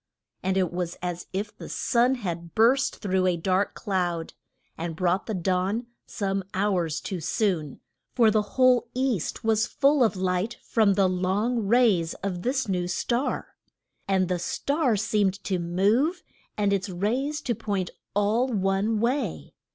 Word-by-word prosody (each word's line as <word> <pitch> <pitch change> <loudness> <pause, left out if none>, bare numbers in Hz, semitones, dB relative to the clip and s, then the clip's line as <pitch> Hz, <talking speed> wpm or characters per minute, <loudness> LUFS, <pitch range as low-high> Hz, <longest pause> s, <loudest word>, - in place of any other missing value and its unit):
And 190 0 0
it 180 -3 +1
was 175 -1 -3
as 175 -1 -4
if 205 +3 -4
the - - -9
sun 245 +2 +2
had 170 -7 -5
burst 255 +5 +3
through 190 -2 0
a 180 -1 +1
dark 185 +3 0
cloud, 175 -5 -2 0.4
and 165 -1 -4
brought 180 +3 0
the 220 - -2
dawn 185 +6 0 0.2
some 195 -2 -2
hours 180 -6 0
too 185 +4 -5
soon, 165 -4 -1 0.3
for 230 -3 +5
the 215 0 +3 0.2
whole 255 -2 +5
East 255 - -1
was 220 -1 +2
full 280 -1 +3
of 220 -3 +2
light 185 +4 -1
from 210 -4 +3
the 195 -1 +4
long 195 +5 0
rays 205 -8 +3
of 185 -3 -2
this 260 +5 0
new 180 -2 -1
star. 240 +8 -2 0.5
And 190 -2 +2
the 180 -1 -1
star 280 - 0
seemed 205 -2 +1
to 185 -2 -1
move, 205 - +1 0.3
and 205 -1 +2
its 195 0 -1
rays 245 +11 -1
to 240 - -1
point 200 -4 -3 0.2
all 210 +5 +2
one 205 -1 0
way. 255 +5 -1
200 Hz, 155 wpm, -26 LUFS, 180-230 Hz, 0.5 s, for